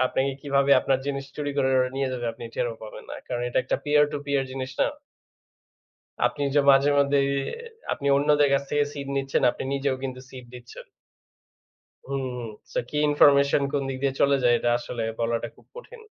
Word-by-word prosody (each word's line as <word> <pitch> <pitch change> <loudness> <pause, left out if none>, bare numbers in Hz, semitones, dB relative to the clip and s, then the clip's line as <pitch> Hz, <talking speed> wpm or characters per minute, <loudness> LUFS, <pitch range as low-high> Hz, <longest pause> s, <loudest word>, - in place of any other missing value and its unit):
আপনাকে 135 +2 0
কিভাবে 140 -1 +1
আপনার 135 -1 +1
জিনিস 140 -1 -3
চুরি 145 -1 -2
করে 135 -1 +2
ওটা 130 0 +1
নিয়ে 135 -1 0
যাবে 120 -2 -3
আপনি 115 - -10
টেরও 120 -2 -1
পাবেন 110 - -9
না। - - -5
কারণ 120 -1 -3
এটা - - 0
একটা 130 - -1
peer 150 0 +4
to 145 - -2
peer 140 -1 +1
জিনিস 130 0 -5
না। - - +4 1.4
আপনি 145 - -3
যে 145 - +5
মাঝে 140 +1 +5
মধ্যেই 140 0 +3 0.6
আপনি 140 - -4
অন্যদের 145 0 +3
কাছ 140 - +2
থেকে 145 0 +2
seed 140 -1 -7
নিচ্ছেন, 135 0 0
আপনি - - -7
নিজেও 135 -1 0
কিন্তু 130 -1 -5
seed 125 -2 -10
দিচ্ছেন। 120 -1 -11 1.2
হুম 135 -1 -3
হুম। 120 -2 -5 0.2
So - - -1
কি 150 - -6
information 140 -1 +5
কোন 145 -1 0
দিক 130 - -3
দিয়ে 135 -1 +1
চলে 140 0 +4
যায় 120 -1 +4
এটা 120 - 0
আসলে 120 -1 -5 0.2
বলাটা 115 0 -1
খুব - - -22
কঠিন। - - -11
135 Hz, 190 wpm, -25 LUFS, 130-140 Hz, 1.4 s, যে